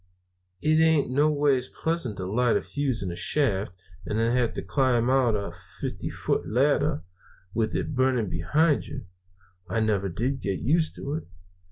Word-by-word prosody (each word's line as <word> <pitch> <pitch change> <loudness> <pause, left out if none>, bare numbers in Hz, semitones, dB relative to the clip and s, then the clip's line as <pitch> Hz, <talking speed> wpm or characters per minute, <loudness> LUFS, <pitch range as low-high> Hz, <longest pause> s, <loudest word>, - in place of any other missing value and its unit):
"It 155 +1 +4
ain't 160 -5 +3
noways 145 -2 +2
pleasant 160 - -2
to 95 - -4
light 115 +5 +2
a - - -2
fuse 135 -7 -1
in 90 - -3
a - - -5
shaft, 100 -8 0 0.3
and 105 +5 -2
then 115 +2 +2
have 125 -2 +2
to - - -4
climb 125 +3 +2
out 130 -4 +3
a 100 -1 -3 0.3
fifty - - -4
foot - - -2
ladder, 145 +5 +2 0.5
with 110 -1 0
it - - -2
burning 130 -4 +2
behind 150 - +2
you. 135 -5 -7 0.6
I 115 - 0
never 105 -3 +1
did 125 +9 -2
get 100 -2 -1
used 160 +5 +1
to 140 - -5
it. 160 - -9
125 Hz, 170 wpm, -26 LUFS, 110-145 Hz, 0.6 s, It